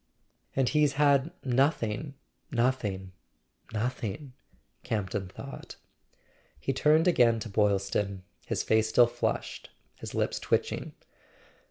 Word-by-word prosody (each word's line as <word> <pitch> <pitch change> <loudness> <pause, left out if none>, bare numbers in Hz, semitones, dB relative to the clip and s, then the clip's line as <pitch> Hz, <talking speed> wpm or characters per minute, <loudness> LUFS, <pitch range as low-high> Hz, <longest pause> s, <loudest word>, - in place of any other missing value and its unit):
"And 135 -2 +2
he's 150 0 +3
had 140 0 +3 0.2
nothing—nothing—nothing 120 - -2 0.2
!" - - -42
Camp 105 -4 -2
ton 95 -3 -2
thought. 135 +8 -9 0.8
He 135 - -1
turned 155 +5 +4
again 120 -9 +4
to 115 - -5
Boylston, 100 -1 0 0.2
his - - -1
face 110 0 +2
still 120 +2 +6
flushed, 120 - -3 0.2
his - - -8
lips - - 0
twitching. - - -1
120 Hz, 105 wpm, -29 LUFS, 105-140 Hz, 0.8 s, still